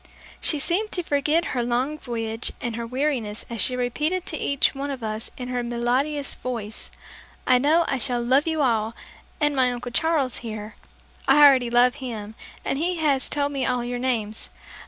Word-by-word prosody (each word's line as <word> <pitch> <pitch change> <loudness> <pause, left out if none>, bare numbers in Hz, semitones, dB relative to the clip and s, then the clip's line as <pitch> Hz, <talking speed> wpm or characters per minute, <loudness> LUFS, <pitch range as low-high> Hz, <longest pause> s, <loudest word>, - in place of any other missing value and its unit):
She 305 - +3
seemed 370 +9 0
to 355 - -1
forget 300 +3 +1
her 250 - 0
long 250 +6 -1
voyage 225 -3 -3
and 240 -2 -3
her 230 0 -4
weariness 250 -5 -1
as 230 - 0
she 255 - +4
repeated 300 +9 -1
to - - -3
each 280 -2 +1
one 280 +1 -4
of 265 -4 -5
us 215 0 -3
in 250 -1 -5
her 250 -1 -1
melodious 250 +5 -1
voice, 225 -4 -5 0.6
"I 255 -1 +5
know 315 +5 +3
I 270 - 0
shall 245 0 0
love 265 +6 +3
you 320 -2 +1
all, 225 -3 +1 0.4
and 295 -1 +2
my 255 -2 +3
Uncle 245 0 -5
Charles 305 -2 +1
here. 215 -2 -7 0.5
I 290 +2 +8
already 260 -4 +6
love 245 +3 +4
him, 220 -4 -5 0.3
and 275 - -1
he 355 +3 0
has 290 -5 +2
told 285 -1 0
me 275 -2 -2
all 245 0 0
your 245 0 -3
names. 225 -4 -2
255 Hz, 185 wpm, -24 LUFS, 235-290 Hz, 0.6 s, I